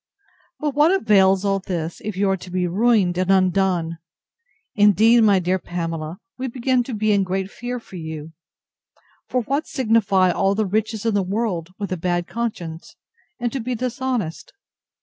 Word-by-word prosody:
But 295 -2 -1
what 295 +4 +4
avails 195 - +4
all 195 0 +1
this, 170 -4 -4
if 210 -3 -4
you 200 +1 +2
are - - +2
to 185 - -11
be 180 0 -1
ruined 190 -1 +2
and 185 0 0
undone!—Indeed, 195 - +1
my 205 -3 +5
dear 185 +1 0
Pamela, 165 -2 -4 0.2
we 260 - -2
begin 255 +1 +1
to 245 - -4
be 215 0 +1
in 200 -1 +3
great 190 +1 -3
fear 245 +1 -5
for 195 -5 -11
you; 160 -1 -7 1.0
for 250 -1 0
what 280 +7 -1
signify 215 -7 +2
all 195 +2 +1
the 215 +1 +1
riches 220 +2 -2
in 225 - +2
the 200 - +2
world, 190 -3 -2
with 200 -2 -5
a 185 - -1
bad 175 +1 -1
conscience, 180 -8 -5 0.4
and 240 -1 -1
to 270 - -2
be 245 +1 -3
dishonest! 245 -7 -3
195 Hz, 170 wpm, -22 LUFS, 180-235 Hz, 1.0 s, my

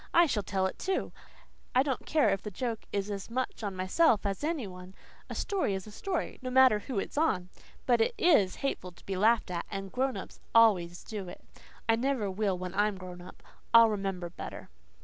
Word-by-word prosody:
"I 345 +1 +8
shall 235 -9 0
tell 190 -1 -1
it, 190 - -3
too. 380 0 -1 0.6
I 255 - +6
don't 270 -3 -3
care 310 -2 +3
if 195 - -1
the 210 - -5
joke 230 +2 -4
is 200 0 -2
as 200 +1 -5
much 255 +1 -3
on 200 -3 -3
myself 200 - +3
as 200 +6 -2
any 305 -5 -1
one. 180 0 -10 0.3
A - - -5
story 375 - 0
is 190 - -5
a 215 - -10
story, 365 - -3
no 255 - -4
matter 255 -4 +6
who 230 +2 -5
it's 240 - -2
on. 185 - +1 0.4
But 240 -2 +3
it - - +1
IS 250 - +4
hateful 180 -9 -3
to - - -20
be 195 - -3
laughed 215 +1 +3
at 170 -1 -3
and 195 -1 -5
grown 260 0 0
ups - - -9 0.2
always 180 -7 +4
do 205 -4 -6
it. 175 - -11 0.4
I 225 0 +4
never 240 -5 0
will 195 -1 0
when 180 0 -5
I'm 205 0 +1
grown 180 -1 -9
up. 180 - -13 0.3
I'll 230 -1 +9
remember 195 -4 -3
better." - - -8
210 Hz, 210 wpm, -30 LUFS, 190-255 Hz, 0.6 s, I'll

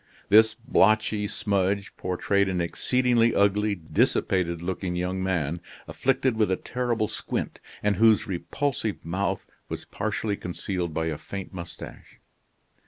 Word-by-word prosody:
This 110 +2 +6
blotchy 110 -3 +2
smudge 100 -2 -1
portrayed 95 +2 0
an 90 -1 -1
exceedingly 120 +6 +2
ugly, 100 +1 +3
dissipated 85 0 +1
looking 90 +1 -3
young 90 +1 -1
man, 85 -3 -1 0.3
afflicted 130 -2 +1
with 110 -2 +3
a 95 - +2
terrible 120 0 -1
squint, - - -4 0.2
and 105 -2 +2
whose 110 0 +5
repulsive 110 - -2
mouth 95 +3 -1 0.2
was - - -5
partially 105 0 -2
concealed 90 -1 -3
by 80 +1 -1
a 80 -2 -3
faint 95 +5 -7
mustache. 85 -2 -9
100 Hz, 125 wpm, -26 LUFS, 90-110 Hz, 0.3 s, This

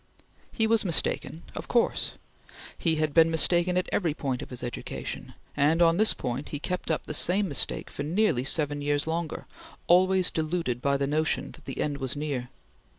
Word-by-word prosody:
He 220 - +1
was 225 0 +3
mistaken 170 -2 -1
of - - -6
course! 235 - +1 0.6
He 165 -2 +1
had 155 -1 0
been 165 -1 +6
mistaken 175 +2 +2
at 180 - 0
every 165 -6 0
point 130 -5 -2
of - - -8
his 125 -1 -6
education, 120 - -6 0.2
and, 150 +3 +3
on 170 -1 +5
this 215 +1 +4
point, 125 +2 -4
he 145 - -3
kept 180 +3 -4
up 160 - 0
the - - -5
same 190 +6 +3
mistake 145 - -1
for - - -6
nearly 160 - +1
seven 145 +1 0
years 145 0 0
longer, 160 0 -3 0.4
always 185 +1 +4
deluded 155 -6 -2
by 140 +1 +2
the 140 - 0
notion 155 +2 0
that 155 -4 -16
the 135 - -6
end 145 -1 -1
was 130 0 -2
near. 140 -4 -3
155 Hz, 185 wpm, -27 LUFS, 140-175 Hz, 0.6 s, been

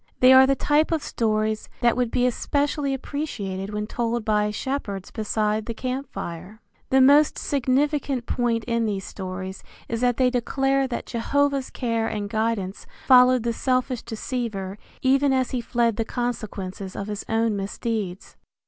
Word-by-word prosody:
They 255 +1 +8
are 260 0 +8
the 275 - +3
type 300 +4 +2
of 320 -3 0
stories 215 -1 -1
that 235 -1 +4
would 250 -2 0
be 245 +2 +1
especially 285 +3 0
appreciated 210 -10 -4
when 210 0 -2
told 235 0 -2
by 210 -1 +2
shepherds 210 -4 -4
beside 215 0 -1
the 230 - -4
camp 260 +3 -4
fire. 180 +6 -7 0.3
The 265 - +4
most 285 +3 +6
significant 275 -1 0
point 235 -2 0
in 230 -1 0
these 195 -2 -3
stories 185 0 -6 0.3
is 230 0 -3
that 245 -1 +2
they 255 -1 +3
declare 270 +2 +1
that 245 - -4
Jehovah's 275 +3 0
care 230 -2 -1
and 205 -1 -4
guidance 220 -4 -2 0.2
followed 255 -2 +6
the 235 -1 0
selfish 255 0 0
deceiver 215 -4 -4 0.2
even 270 +1 +4
as 260 -2 +1
he 250 - -1
fled 235 -2 +1
the 225 - +1
consequences 205 -6 -4
of 200 - -4
his 210 0 -5
own 225 -1 +1
misdeeds. 200 -1 -4
235 Hz, 155 wpm, -24 LUFS, 210-260 Hz, 0.3 s, They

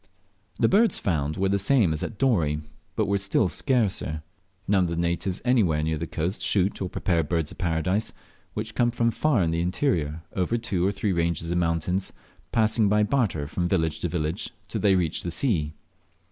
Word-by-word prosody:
The - - +3
birds 220 +3 +3
found 75 -4 -1
were 95 0 +1
the 100 0 +2
same 100 - +3
as 75 - -4
at 110 - -5
Dorey, 85 - +1 0.3
but - - +1
were 100 0 +1
still 100 +1 +2
scarcer. 100 - 0 0.4
None 95 -2 +3
of - - -2
the 85 - -2
natives 85 +2 -1
anywhere 95 -12 +3
near 80 0 -1
the 85 - -3
coast 85 +7 -3
shoot 100 0 +1
or 95 - -2
prepare 85 -2 0
Birds 80 0 -1
of - - -13
Paradise, 90 +5 0 0.4
which 110 +1 -4
come 120 -1 +2
from 115 -1 +1
far 130 -6 +2
in 80 - 0
the 85 0 0
interior 85 - -1
over 95 +5 0
two 100 -6 -1
or - - +2
three 100 0 -1
ranges 85 -1 -1
of 90 - +1
mountains, 85 +3 0 0.4
passing 110 -1 +3
by 105 +1 +3
barter 105 - 0
from 85 +4 -2
village 80 -4 0
to - - -1
village 80 +1 -2 0.2
till - - -4
they 100 -2 +4
reach 85 -4 0
the 85 - -4
sea. 80 - 0
90 Hz, 195 wpm, -25 LUFS, 80-105 Hz, 0.4 s, they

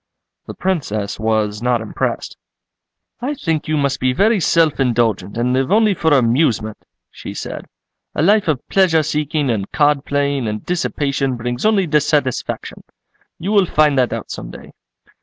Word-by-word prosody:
The - - -7
Princess 110 - -2
was 110 -1 0
not 125 -1 +1
impressed. 110 - -3 0.9
"I 280 +4 -2
think 160 - -2
you 155 0 0
must 140 -1 0
be 130 0 +1
very 210 - +3
self 165 -3 +2
indulgent 115 -6 0
and 125 +2 +1
live 130 +5 0
only 215 0 +4
for 160 -3 0
amusement," 115 -4 +2 0.3
she - - -9
said, - - -6 0.5
"a - - +1
life 205 +2 +3
of 150 -6 -1
pleasure 175 -5 +3
seeking 150 -2 -1
and 100 -3 -3
card 145 -2 +2
playing 140 -4 -1
and 105 0 -4
dissipation 140 -6 -1
brings 120 - -2
only 205 -3 +3
dissatisfaction. 150 -4 -1 0.5
You 185 +5 -3
will 200 -4 +4
find 150 -2 +3
that 125 - +2
out - - -5
some - - -6
day." - - -12
140 Hz, 160 wpm, -18 LUFS, 120-165 Hz, 0.9 s, only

